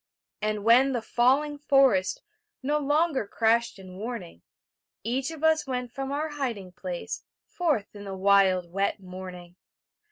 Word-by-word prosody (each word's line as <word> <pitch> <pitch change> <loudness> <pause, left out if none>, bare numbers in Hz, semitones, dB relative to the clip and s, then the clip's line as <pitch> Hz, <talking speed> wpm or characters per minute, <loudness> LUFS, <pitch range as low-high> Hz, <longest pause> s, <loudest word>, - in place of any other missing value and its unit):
And 210 -1 -1
when 250 +5 +5
the 240 - -1
falling 280 +6 +2
forest 270 -10 +3 0.4
No 295 +3 +1
longer 295 -4 +1
crashed 230 +1 +1
in 185 -1 -11
warning, 205 - -6 0.6
Each 255 +6 -1
of 320 -1 -8
us 320 -2 +3
went 250 -2 -3
from 270 +2 -4
our 300 +3 -1
hiding 240 -11 -4
place 180 -1 -5 0.2
Forth 295 - -1
in 205 0 -9
the 195 -1 -5
wild 190 -2 +3
wet 195 +3 0
morning. 180 -1 -9
230 Hz, 140 wpm, -27 LUFS, 190-275 Hz, 0.6 s, when